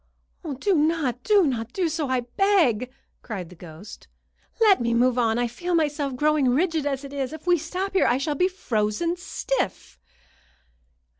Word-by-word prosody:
"Do 400 +8 +1
not! 300 -6 +1
Do 410 -4 +4
not 240 -3 -2
do 370 -3 0
so, 310 -3 -2
I 255 -1 +1
beg!" 255 - +1 0.3
cried 190 -7 -6
the 180 - -13
ghost. 170 +4 -12 0.5
"Let 420 - +5
me 235 0 +1
move 250 +1 +3
on. 225 -1 +2
I 245 - +1
feel 345 +10 -3
myself 295 -4 0
growing 295 -1 +2
rigid 315 +2 +1
as 275 -1 -2
it 280 0 -9
is. 275 0 -3
If 315 +1 -10
we 355 -2 +3
stop 370 +5 -4
here, 385 - +3
I 245 - +3
shall 295 +3 -1
be 360 +6 +2
frozen 265 - -1
stiff." 385 +7 -4
285 Hz, 170 wpm, -24 LUFS, 245-345 Hz, 0.5 s, Let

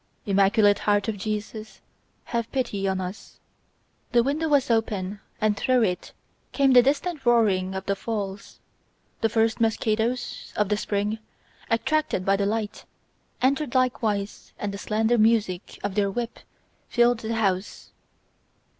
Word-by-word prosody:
"Immaculate 205 +1 +4
heart 205 -1 +1
of 220 - -1
Jesus, 215 +1 -5 0.4
have 235 -1 -3
pity 225 -7 -1
on 190 -1 0
us..." 185 +2 -7 0.7
The 240 -1 +5
window 295 +5 0
was 280 -4 +3
open 205 -3 -1 0.2
and 215 -1 +2
through 250 +3 +2
it 180 -4 -2 0.4
came 275 -1 +3
the 250 - +9
distant 295 +5 -1
roaring 200 -6 +2
of 190 0 -4
the 200 - 0
falls. 200 -2 -5 0.6
The 225 - +2
first 225 +1 +1
mosquitos, 225 +2 -1
of 210 -2 +1
the 210 - +1
spring, 210 +1 -1 0.5
attracted 230 -4 0
by 195 - +4
the 200 0 0
light, 215 0 -3 0.6
entered 275 0 +1
likewise 220 -5 -1
and 205 -1 -3
the 200 - -6
slender 220 +3 +1
music 215 -5 +1
of 205 -1 -2
their 200 0 +1
wings 235 +4 -5 0.4
filled 240 -1 +3
the 225 0 -3
house. 195 -3 -2
220 Hz, 140 wpm, -25 LUFS, 200-240 Hz, 0.7 s, the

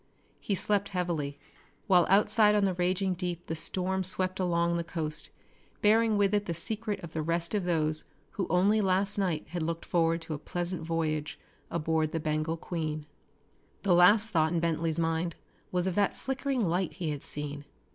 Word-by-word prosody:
He 200 - -1
slept 200 +2 +1
heavily, 155 -6 -2 0.5
while 180 -4 +4
outside 210 +2 +5
on 205 -1 +3
the 190 - +1
raging 185 +2 0
deep 175 -1 -4
the 160 - -3
storm 185 +3 -1
swept 185 0 0
on 185 - +1
along 170 0 +1
the 170 - -1
coast, 160 -2 -4 0.5
bearing 220 +1 +4
with 200 0 +2
it 205 0 +1
the 170 - -2
secret 210 +4 -1
of 165 -2 -8
the 160 - -1
rest 170 +3 0
of 200 -4 0
those 155 -3 +1 0.3
who 190 - -3
only 200 +5 +3
last 195 +1 +1
night 175 -6 0
had 175 0 -3
looked 165 +1 -3
forward 165 -1 +2
to 165 - -5
a 145 - -4
pleasant 175 +2 -3
voyage 160 -2 -2 0.3
aboard 160 -1 0
the 165 - 0
Bengal 155 +1 -1
Queen. 155 -3 -4 0.8
The 195 - +3
last 205 +5 +6
thought 160 -3 +2
in 170 - +1
Bentley's 165 -1 +1
mind 165 +1 0 0.4
was 180 -1 +1
of 190 - 0
that 200 +2 +1
flickering 265 -4 -1
light 180 +1 0
he 165 -4 -3
had 145 -2 -5
seen. 145 -1 -4
175 Hz, 185 wpm, -29 LUFS, 160-195 Hz, 0.8 s, last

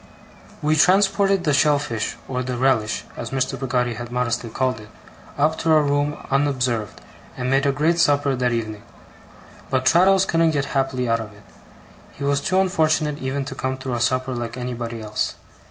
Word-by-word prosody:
We 155 +1 +3
transported 195 +3 +3
the 150 -4 +1
shellfish, 140 -6 +1
or 125 -1 -2
the 125 -1 -3
'relish' 120 -4 +1
as - - -5
Mr. 135 -1 -1
Peggotty 125 -2 0
had 120 +2 -7
modestly 120 -1 -1
called 130 0 -1
it, 105 0 -13 0.5
up 155 +2 +3
into 165 +1 -3
our 155 -1 +5
room 145 +1 0
unobserved, 130 -6 0 0.4
and 125 0 -2
made 135 +1 +3
a - - +4
great 160 +5 +1
supper 145 -3 +3
that 125 -1 0
evening. 110 -3 -3 0.9
But 130 -1 0
Traddles 185 +5 +5
couldn't 165 -3 +2
get 140 - 0
happily 135 -2 0
out 115 0 +2
of 105 -2 -8
it. 105 0 -18 0.7
He 140 - -8
was 140 0 +1
too 185 +5 +1
unfortunate 155 -5 +1
even 135 +1 -3
to 135 - -6
come 130 0 -3
through 130 -1 -5
a 120 - -2
supper 130 +2 0
like 120 0 -5
anybody 120 -2 -5
else. 105 0 -2
135 Hz, 180 wpm, -22 LUFS, 120-150 Hz, 0.9 s, our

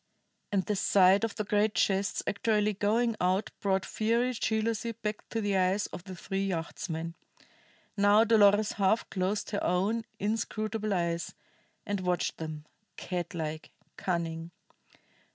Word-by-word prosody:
And 195 -2 +2
the 210 - 0
sight 195 +1 +5
of 225 -2 -1
the 215 - -2
great 210 +1 +1
chests 195 0 +1
actually 210 0 +1
going 220 +4 +1
out 185 +3 +1
brought 190 -1 +1
fiery 235 +3 +1
jealousy 225 0 -1
back 215 -1 -5
to 225 - -2
the 205 -1 0
eyes 190 +2 +2
of 180 - -7
the 190 -2 -7
three 195 +2 -3
yachtsmen. 165 -1 -4 0.8
Now 205 +1 +5
Dolores 210 -2 +5
half 205 +2 +1
closed 195 +2 -1
her 205 - -1
own 205 +6 +1
inscrutable 215 0 -2
eyes, 170 -2 -1 0.5
and 205 -1 -1
watched 180 -1 -1
them, 155 -2 -6 0.3
catlike, 165 -3 -4 0.3
cunning. 165 -2 -2
200 Hz, 135 wpm, -30 LUFS, 180-215 Hz, 0.8 s, sight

